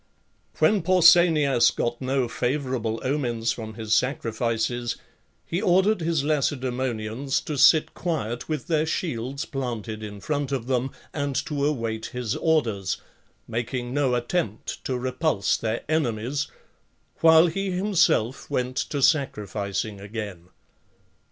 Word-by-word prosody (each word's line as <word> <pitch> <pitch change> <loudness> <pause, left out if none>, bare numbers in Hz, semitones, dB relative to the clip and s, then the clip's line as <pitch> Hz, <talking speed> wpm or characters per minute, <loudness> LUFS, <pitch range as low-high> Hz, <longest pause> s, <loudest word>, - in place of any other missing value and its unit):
When 210 -2 +4
Pausanias 170 -7 +5
got 120 +1 -2
no 130 -1 0
favourable 120 -2 -2
omens 120 -5 0
from 110 -2 -6
his 110 -1 -2
sacrifices, 120 -1 0 0.5
he 175 +3 -2
ordered 190 +1 +3
his 160 -3 0
Lacedaemonians 130 -4 -1
to 150 - -4
sit 155 +3 +5
quiet 120 -9 -3
with 155 -4 -2
their 160 -1 +1
shields 140 -5 -2
planted 115 -5 -4
in 105 -1 -7
front 145 +4 -2
of 130 -4 -2
them, 130 0 0 0.2
and 145 -2 -2
to 145 -3 -2
await 115 -6 -2
his 125 -3 -3
orders, 115 - +1 0.5
making 120 +2 -3
no 135 -3 +2
attempt 120 - -2
to 130 - -1
repulse 130 -3 0
their 115 +1 -2
enemies, 140 -2 -1 0.7
while 160 0 +7
he 195 +3 -1
himself 180 - +1
went 125 0 -2
to 140 -2 -1
sacrificing 105 - 0
again. 100 -4 -7
130 Hz, 120 wpm, -25 LUFS, 115-155 Hz, 0.7 s, while